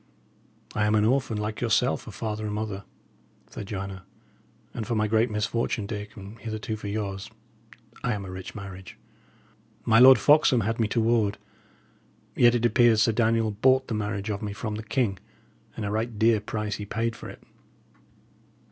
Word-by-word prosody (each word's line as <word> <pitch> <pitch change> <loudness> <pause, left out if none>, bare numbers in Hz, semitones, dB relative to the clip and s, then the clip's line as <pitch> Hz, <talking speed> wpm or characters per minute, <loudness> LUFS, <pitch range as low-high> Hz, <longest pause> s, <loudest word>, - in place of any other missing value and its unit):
"I 105 0 +1
am 105 - +2
an 105 0 +3
orphan, 125 -2 +1
like 105 0 -4
yourself, 115 -4 +1
of - - -9
father 110 -1 -4
and 105 - -3
mother," 105 -2 -4 0.7
said 100 - -7
Joanna; 95 -2 -5 0.7
"and 110 -3 -5
for 120 - -1
my 110 0 +2
great 110 +2 +2
misfortune, 105 +1 -1
Dick, 105 0 -6
and 100 +3 -10
hitherto 110 -1 -4
for 105 -1 -7
yours, 100 -1 -4 0.7
I 125 - +1
am 100 -2 -5
a 95 - -7
rich 95 0 -8
marriage. 95 -2 -9 0.9
My 115 0 +5
Lord 130 0 +9
Foxham 145 -3 +4
had 115 +3 -2
me 110 - +2
to 115 +2 0
ward; 110 -3 +2 1.0
yet 120 0 +5
it 120 0 +1
appears 120 -2 +4
Sir 115 - +3
Daniel 115 -1 +1
bought 130 +5 +2
the - - -2
marriage 105 0 -2
of 105 - -4
me 105 -2 -4
from 110 +1 -4
the 105 - -4
king, 110 -4 -1 0.6
and 110 - -3
a 100 - -2
right 110 +1 -2
dear 110 0 +4
price 105 0 -3
he 105 - -6
paid 115 +2 -2
for - - -9
it. - - -12
110 Hz, 180 wpm, -26 LUFS, 105-115 Hz, 1.0 s, Lord